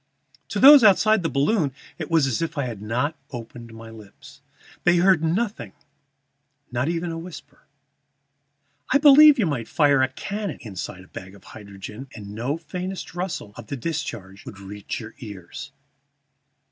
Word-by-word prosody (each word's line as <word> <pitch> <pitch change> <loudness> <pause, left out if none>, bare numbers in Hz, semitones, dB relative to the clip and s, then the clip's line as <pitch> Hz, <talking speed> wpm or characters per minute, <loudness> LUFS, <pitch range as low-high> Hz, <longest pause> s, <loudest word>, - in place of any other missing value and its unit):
To - - -3
those 280 -1 +9
outside 215 +1 +5
the 165 - -1
balloon 145 - +1 0.3
it - - -5
was 165 -4 +3
as 130 0 -1
if 165 -1 -3
I 140 - 0
had 115 -5 -6
not 125 +9 -2
opened 120 -1 -9
my 115 0 -11
lips. 105 -3 -15 0.4
They 175 0 +4
heard 180 -1 +4
nothing, 175 - -2 1.0
not 125 +3 -1
even 170 0 -2
a 165 - -5
whisper. 170 -2 -12 1.2
I 280 - +6
believe 295 +1 +8
you 220 - +2
might 130 -8 -3
fire 145 -3 +3
a 130 - +3
cannon 200 +7 -5
inside 95 -3 -7
a - - -18
bag 95 +1 -10
of 100 - -18
hydrogen, 105 +4 -10
and 100 -2 -9
no 125 +8 -2
faintest 180 +2 -6
rustle 175 - -5
of - - -10
the 140 - -5
discharge 110 - -5
would 100 - -11
reach 100 +1 -7
your 110 -1 -10
ears. 100 -7 -9
140 Hz, 160 wpm, -23 LUFS, 110-175 Hz, 1.2 s, those